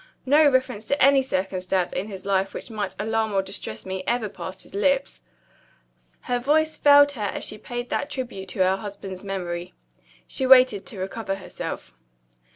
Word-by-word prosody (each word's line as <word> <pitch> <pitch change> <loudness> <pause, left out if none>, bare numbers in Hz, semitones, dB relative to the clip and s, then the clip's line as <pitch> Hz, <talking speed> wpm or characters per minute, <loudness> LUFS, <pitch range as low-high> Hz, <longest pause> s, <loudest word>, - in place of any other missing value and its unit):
No 295 +3 +6
reference 255 -5 0
to 280 - 0
any 275 0 +6
circumstance 185 -5 -1
in 190 +3 -2
his 195 -3 -8
life 195 -1 0
which - - -7
might 210 -3 -3
alarm 220 0 -1
or 195 -1 +2
distress 190 - -7
me 190 0 -4
ever 240 -3 0
passed 185 -1 -7
his - - -15
lips." 275 +7 0 1.0
Her 245 -1 -1
voice 310 +5 +2
failed 285 0 +6
her 250 -6 -8
as 205 - -2
she 215 - -5
paid 240 +2 -5
that 285 - -1
tribute 240 -9 -5
to 185 - +1
her 190 +1 +2
husband's 195 -2 -8
memory. 180 -2 -4 0.5
She 265 - -1
waited 255 -7 +6
to 200 - -5
recover 195 +1 -3
herself. 190 - -7
210 Hz, 170 wpm, -24 LUFS, 190-260 Hz, 1.0 s, No